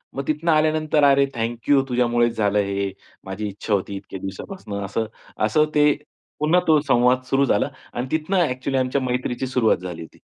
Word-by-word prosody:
मग 140 0 -4
तिथनं 155 +2 +1
आल्यानंतर 155 -1 +2
"अरे 140 0 +5
थँक 115 0 -4
यू 140 -2 +6
तुझ्यामुळेच 120 -1 +2
झालं 105 -1 +2
हे, 100 -1 -1 0.3
माझी 95 +2 -4
इच्छा 105 +2 -4
होती 100 0 -1
इतक्या 95 0 -8
दिवसापासून," 100 - -7
असं. 110 +3 -2 0.4
असं 150 +8 +3
ते 150 0 +5 0.5
पुन्हा 155 +4 +3
तो 155 -2 +5
संवाद 125 -2 +3
सुरू 135 +1 +3
झाला 140 - +1 0.2
आणि 120 +2 -3
तिथनं 160 +5 0
ॲक्चुअली 130 +1 -2
आमच्या 130 +2 0
मैत्रीची 125 0 -2
सुरुवात 125 -3 +2
झाली 90 -2 -7
होती. 80 - -12
125 Hz, 175 wpm, -22 LUFS, 105-145 Hz, 0.5 s, यू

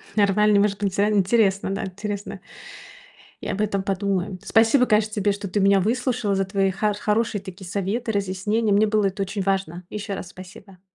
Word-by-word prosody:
Нормально, 210 0 +4
может 200 -1 +1
быть, 205 - -6
не - - -14
знаю. 205 +2 +1
Интересно, 195 -1 +2
да, - - -3
интересно. 205 +1 -6 1.0
Я - - -3
об 205 - -2
этом 200 -2 0
подумаю. 195 -1 -2
Спасибо, 230 +3 +4
конечно, 215 -1 +2
тебе, 205 -1 +1
что 200 0 -5
ты 205 +3 -1
меня 195 0 +4
выслушала 235 0 0
за 195 0 0
твои 195 0 +1
хар 205 +2 -1
хорошие 210 -1 0
такие 190 -1 -10
советы, 205 +5 -2
разъяснения. 200 +2 -1
Мне 205 +2 +4
было 210 -2 +2
это 195 +1 -3
очень 195 +1 -4
важно. 190 -2 -2
Ещё 210 -1 -5
раз 180 - -7
спасибо. 185 +1 -13
200 Hz, 185 wpm, -23 LUFS, 195-210 Hz, 1.0 s, Нормально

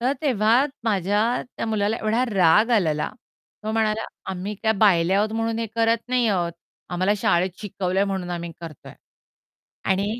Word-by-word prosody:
तर 255 +3 +1
तेव्हा 240 -1 +3 0.2
माझ्या 205 -1 +1 0.4
त्या - - -3
मुलाला 215 0 0
एवढा 225 +4 0
राग 195 +5 +4
आलेला, 160 -10 +2 0.6
तो 215 - -2
म्हणाला, 220 0 0 0.3
"आम्ही 190 +3 -4
काय 220 - +3
बायले 185 -4 +4
आहोत, 215 +2 +1
म्हणून 225 0 -1
हे 230 - -1
करत 230 +1 +1
नाही 250 -1 +2
आहोत. 175 -4 0 0.4
आम्हाला 185 +3 +1
शाळेत 185 -1 +1
शिकवलंय, 195 -2 -1
म्हणून 190 -3 -3
आम्ही 170 -1 -4
करतोय." 165 -4 -10 1.0
आणि 195 +1 +2
205 Hz, 155 wpm, -23 LUFS, 185-225 Hz, 1.0 s, राग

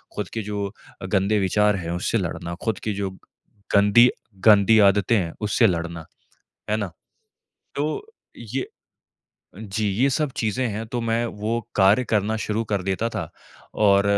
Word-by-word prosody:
खुद - - -4
के 115 - -2
जो 100 -1 -2 0.4
अ, - - -5
गंदे 100 +2 +1
विचार 105 +2 +2
हैं 85 -2 -5
उससे 90 +6 -1
लड़ना, 85 -1 -4
खुद 110 -4 -1
की 110 - -3
जो 100 -1 -2 0.7
गंदी, 105 +5 +6 0.4
गंदी 110 0 +6
आदतें 105 +3 +1
हैं 85 -4 -2
उससे 105 +2 +3
लड़ना, 85 -3 -3 0.7
है 105 - +2
ना? 100 -5 -4 0.8
तो 150 - -2 0.3
ये 120 +3 -4 0.9
जी 105 0 -3
ये 120 +8 +2
सब 150 +2 0
चीज़ें 115 +3 0
हैं, 110 +1 -4
तो 120 +1 -3
मैं 115 0 0
वो 105 0 -4 0.2
कार्य 100 +5 +5
करना 110 -1 0
शुरू 110 0 -2
कर 100 -2 0
देता 95 +4 -1
था - - -3 0.6
और 100 -1 +5
105 Hz, 155 wpm, -23 LUFS, 95-115 Hz, 0.9 s, गंदी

